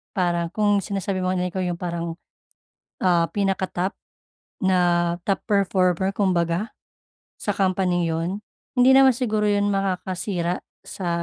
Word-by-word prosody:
parang 175 -3 +1
kung 205 -1 +3
sinasabi 195 -1 -3
mo 185 0 0
na 180 0 -1
ikaw 190 - -4
yung 180 -1 -1
parang, 170 -1 -4 0.9
ah, 175 -2 +3
pinaka-top 195 -1 -1 0.6
na 175 -2 +2
top 195 - 0
performer 190 -1 +2
kumbaga, 180 0 0 0.7
sa 205 - -2
companing 185 -2 +1
yun, 170 +5 -2 0.3
hindi 250 +1 +6
naman 265 -2 +6
siguro 215 -4 0
yun 205 0 +2
makakasira 185 -2 -2 0.2
sa 185 -3 -5
185 Hz, 125 wpm, -23 LUFS, 175-200 Hz, 0.9 s, hindi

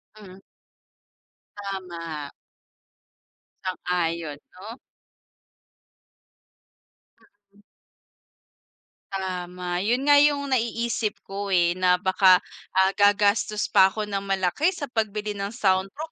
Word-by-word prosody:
Hmm. 195 -3 -13 1.2
Tama. 170 -7 -6 1.3
Sang-ayon, 170 -4 -2 0.2
'no? 215 +6 -10 2.8
Mm. 205 - -23 1.5
Tama. 180 -2 -4
Yon 235 +7 0
nga 290 0 +7
yung 285 -1 +2
naiisip 235 -2 -1
ko, 200 +1 -5
eh, 175 -3 +3
na 180 -1 +4
baka, 185 0 +4 0.3
ah 190 0 +4
gagastos 205 +1 +2
pa 190 - +7
ko 215 +3 -4
ng 205 -1 -3
malaki 195 - 0
sa 325 - -7
pagbili 215 -2 -2
ng 200 -1 -4
soundproof, 195 +9 -1
195 Hz, 90 wpm, -24 LUFS, 180-215 Hz, 2.8 s, nga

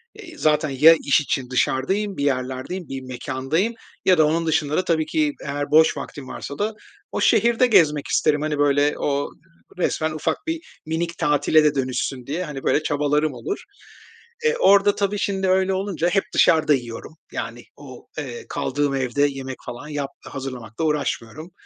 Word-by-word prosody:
eee, 330 -3 -12
zaten 155 0 +2
ya 150 +5 +7
iş 140 +1 +4
için 130 -3 -2
dışarıdayım, 190 +11 0
bir 140 - -2
yerlerdeyim, 130 +6 -2
bir 135 0 -5
mekândayım 130 - -2 0.3
ya 185 -2 +5
da 155 - +5
onun 165 +2 +1
dışında 155 -2 +1
da 185 - +2
tabii 160 -2 +1
ki 155 -2 0
eğer 145 +1 -3
boş 160 +1 +5
vaktim 140 -3 -7
varsa 140 - -7
da 215 +1 0 0.4
o - - -2
şehirde 235 +1 +4
gezmek 155 -9 +4
isterim. 150 -1 +2
Hani, 150 -1 -1
böyle 145 0 +3
o 145 0 -1 0.5
resmen 160 -3 0
ufak 155 - -1
bir, 325 +1 -5
minik 165 +2 -2
tatile 150 +1 +3
de 150 -1 +2
dönüşsün 130 -1 -2
diye 160 +7 -3
hani 140 -3 -7
böyle 155 - +2
çabalarım 150 0 +1
olur. 120 -2 -5 0.8
E, 465 +1 +3
orada, 200 - +5
tabii, 205 0 -1
şimdi 195 -1 -1
öyle 190 0 +2
olunca, 185 -3 -1
hep 195 +2 +2
dışarıda 155 -2 +4
yiyorum, 120 +4 -5 0.2
yani, 120 +1 -5
o, 130 -4 -12
eee, 130 -6 -6
kaldığım 145 0 -1
evde 130 +1 -1
yemek 135 -1 -6
falan 125 +5 -7
yap 145 -2 -3 0.2
hazırlamakla 130 0 -5
uğraşmıyorum. 150 +1 -2
150 Hz, 165 wpm, -22 LUFS, 135-170 Hz, 0.8 s, ya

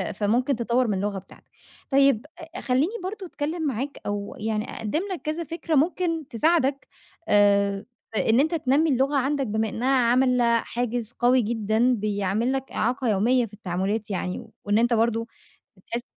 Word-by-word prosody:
فممكن 225 +8 0
تطوّر 240 +1 +1
من 210 - 0
اللغة 200 +1 -2
بتاعتك. 185 - -16 0.4
طيب 275 -3 +3 0.3
أ - - -4
خلّيني 270 - +1
برضه 380 +1 -5
أتكلّم 320 +1 -4
معاك، 270 +2 -3
أو 205 0 -4
يعني 215 0 -2
أقدّم 225 +9 -2
لك 355 - -4
كذا 310 +2 -3
فكرة 330 0 -3
ممكن 330 0 +1
تساعدك 275 +1 +1 0.4
آآ 200 0 +3 0.3
في 220 - +1
إن 230 - +5
أنت 315 +4 +1
تنمّي 300 +1 +2
اللغة 270 +2 +1
عندك، 275 +1 0
بما 220 +1 -1
إنها 245 +5 -2 0.2
عاملة 245 -2 +3
حاجز 240 -1 -3
قوي 245 +1 +3
جدًا 225 +2 +1
بيعمِل 210 +2 -1
لك 270 0 -4
إعاقة 245 +2 0
يوميّة 230 +4 +2
في 210 - -18
التعاملات 200 +2 -3
يعني، 185 -1 -3 0.2
وإن 205 +1 +2
أنت 240 +1 +3
برضه 230 0 +1 0.5
بتحس 235 +5 -5
240 Hz, 160 wpm, -25 LUFS, 215-275 Hz, 0.5 s, إن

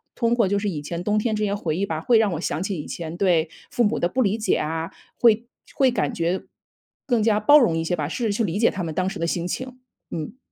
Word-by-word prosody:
通 235 -1 +1
过 230 -4 +3
就 200 +1 +1
是 205 0 -1
以 155 -6 -4
前 170 +3 -4
冬 210 +2 +1
天 220 0 0
这 210 - -1
些 200 -1 0
回 165 -7 -2
忆 195 - -1
吧， 160 -5 -3
会 230 +5 +4
让 215 -3 +2
我 160 - -3
想 160 - -2
起 195 -1 -2
以 150 - -6
前 165 0 -6
对 175 -4 +2 0.2
父 240 - +2
母 210 - +1
的 175 - +2
不 255 - 0
理 210 -2 +1
解 215 -4 +1
啊， 160 +2 -3 0.3
会 230 0 +4 0.3
会 270 -3 +4
感 245 - -1
觉 170 +2 -1 0.6
更 240 -5 +2
加 215 -1 +3
包 290 +8 +7
容 230 - +3
一 165 - -1
些 175 +2 0
吧， 150 -4 -2
试 235 - -3
着 215 - +1
去 210 +3 0
理 195 -1 -1
解 230 - +5
他 185 - -4
们 160 -2 -4
当 185 +3 0
时 200 - -6
的 165 - 0
心 170 +1 -1
情， 255 +6 -5 0.3
嗯。 160 +9 -5
200 Hz, 295 characters per minute, -23 LUFS, 170-225 Hz, 0.6 s, 包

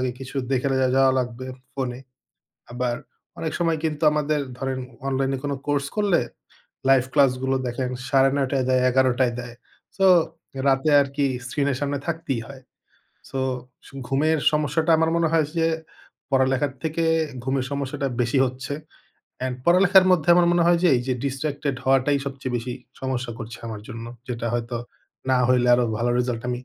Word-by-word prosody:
আগে 130 -1 0
কিছু 135 +1 -8 0.2
দেখে 135 +1 +1
লা 130 -1 +2
যাওয়া 135 -1 +5
লাগবে 125 +1 -5 0.3
ফোনে। 130 -2 -4 0.7
আবার 120 -1 -1 0.4
অনেক 160 - -3
সময় 165 -2 +1
কিন্তু 150 0 -2
আমাদের 150 0 0 0.2
ধরেন 135 -1 -2 0.3
অনলাইনে 135 0 0
কোনো 140 -1 -1
কোর্স 145 -1 0
করলে, 200 -5 +3 0.7
লাইভ 135 -2 +6
ক্লাসগুলো 130 -1 +2
দেখেন 125 +1 -2 0.2
৯ঃ৩০ 135 0 +3
টায় 135 -2 +1
দেয়, 130 0 +3
১১ঃ০০ 130 0 +3
টায় 125 -2 +2
দেয়। 120 -1 -9 0.4
সো 195 0 +3 0.6
রাতে 135 +3 +3
আরকি 140 0 0 0.2
স্ক্রিন 140 +2 -1
এর - - -2
সামনে 145 -1 -1
থাকতেই 160 -7 -2
হয়। 135 -1 -11 0.7
সো 135 - -4 0.7
ঘুমের 155 +4 +2
সমস্যাটা 150 +2 +1
আমার 160 0 +2
মনে 165 -1 +2
হয় 160 -3 +3
যে 165 - +3 0.6
পড়ালেখার 130 +1 +2
থেকে 160 +1 -1 0.4
ঘুমের 130 0 0
সমস্যাটা 140 -1 -2
বেশি 120 +3 +1
হচ্ছে। 130 +2 -5 0.7
অ্যান্ড 130 -1 -2
পড়ালেখার 185 +2 +6
মধ্যে 175 -3 +2
আমার 175 -1 +4
মনে 175 -1 +3
হয় 175 0 +4
যে 180 - +5
এই - - 0
যে 130 - +2
distracted 140 0 -2
হওয়াটাই 135 +2 +3
সবচেয়ে 135 -2 -4
বেশি 120 +1 -4 0.3
সমস্যা 125 -2 -3
করছে 110 0 -7
আমার 105 -2 -6
জন্য। 115 -2 -7 0.2
যেটা 120 -1 -3
হয়তো, 120 0 -2 0.5
না 130 - +4
হইলে 125 -1 +3
আরও 125 0 +2
ভালো 120 +1 +1
রেজাল্ট 120 -2 -1
আমি 125 - -1
135 Hz, 160 wpm, -24 LUFS, 125-150 Hz, 0.7 s, লাইভ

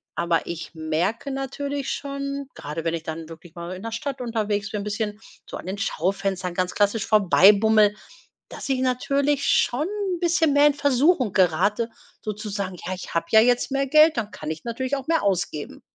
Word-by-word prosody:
Aber 170 -2 0
ich 170 0 -6
merke 165 - -1
natürlich 275 +1 -3
schon, 280 0 -4
gerade 150 +3 -6
wenn 165 - 0
ich 165 -1 -4
dann 160 0 -6
wirklich 165 0 -12
mal 170 +2 -6
in 185 - -10
der 230 - -4
Stadt 260 +4 -4
unterwegs 210 -4 -2
bin, 210 -1 -3
bisschen 210 0 -3 0.3
so - - -7
an - - -10
den 190 +2 -4
Schaufenstern 190 -1 -1
ganz 180 0 -1
klassisch 205 +1 +1
vorbei 205 -2 +6
bummle, 215 0 +4 0.6
dass - - -7
ich 265 -2 +1
natürlich 275 +2 +1
schon 270 +6 +2
'n 395 -4 -3
bisschen 340 -3 +2
mehr 285 +1 +5
in 295 - +4
Versuchung 285 - +2
gerate, 190 +6 +2 0.3
so 215 - -3
zu 210 +1 -7
sagen: 195 -3 -3
„Ja, 185 - -2
ich 180 - -9
habe 165 0 0
ja 220 - +7
jetzt 245 +3 +2
mehr 275 0 0
Geld, 305 +2 +5
dann 215 -2 -2
kann 155 - -6
ich 160 0 -6
natürlich 260 +4 -2
auch 270 -1 -7
mehr 325 0 +2
ausgeben.“ 180 -6 -2
215 Hz, 195 wpm, -24 LUFS, 185-275 Hz, 0.6 s, ja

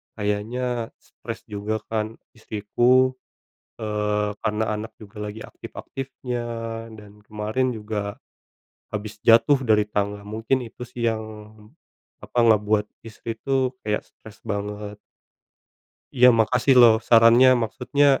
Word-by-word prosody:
kayaknya 115 +3 -2
stres - - -10
juga 105 +1 -3
kan 110 0 -2 0.2
istriku, 120 +4 +2 0.7
eee, 105 -1 -1
karena 110 0 0
anak 110 +1 -6
juga 105 -1 -15
lagi 105 +1 -6
aktif-aktifnya 130 -2 -6 0.5
dan 105 0 -15
kemarin 110 +4 -1
juga 105 -1 -4 0.8
habis 105 0 -5
jatuh 115 +5 +6
dari 110 -2 +4
tangga. 100 0 -2
Mungkin 110 +5 -1
itu 120 +1 -9
sih 120 -1 -6
yang, 110 0 -4 1.0
apa, 125 - -2
ngebuat 105 -1 +3 0.2
istri 115 +1 -7
itu 130 0 0
kayak 105 0 -1
stres 110 -1 -16
banget. 105 0 -4 1.2
Iya. 125 0 +7
Makasih 125 +4 +3
loh, 115 -2 +8
sarannya. 115 +2 +7
Maksudnya 130 +6 0
110 Hz, 110 wpm, -24 LUFS, 105-120 Hz, 1.2 s, loh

